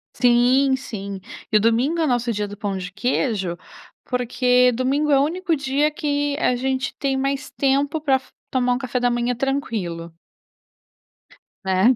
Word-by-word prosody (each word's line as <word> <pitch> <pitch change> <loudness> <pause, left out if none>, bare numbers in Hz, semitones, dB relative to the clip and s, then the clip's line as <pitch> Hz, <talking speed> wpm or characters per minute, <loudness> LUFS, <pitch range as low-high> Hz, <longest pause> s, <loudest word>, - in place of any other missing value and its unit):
Sim, 250 +3 +4
sim 200 -7 -6 0.3
e 215 - +6
o - - +4
domingo 240 +10 +2
é 320 - +2
o - - 0
nosso 245 -2 +1
dia 210 0 -2
do 205 - -9
pão 200 -3 -3
de 180 -1 -6
queijo, 205 -6 -1 0.5
porque 250 0 +3
domingo 275 +5 +1
é 275 - +5
o 275 - +4
único 340 +2 0
dia 285 +1 +1
que 290 -1 -1
a 250 - +2
gente 260 +1 -2
tem 275 -2 0
mais 275 +2 -2
tempo 280 +3 +1
pra 280 -3 +3
f 260 - -5 0.2
tomar 250 -1 +1
um - - 0
café 255 -1 -2
da 245 0 +2
manhã 240 +1 0
tranquilo. 215 -11 -3 1.5
Né. 190 +3 +3
250 Hz, 170 wpm, -22 LUFS, 230-275 Hz, 1.5 s, e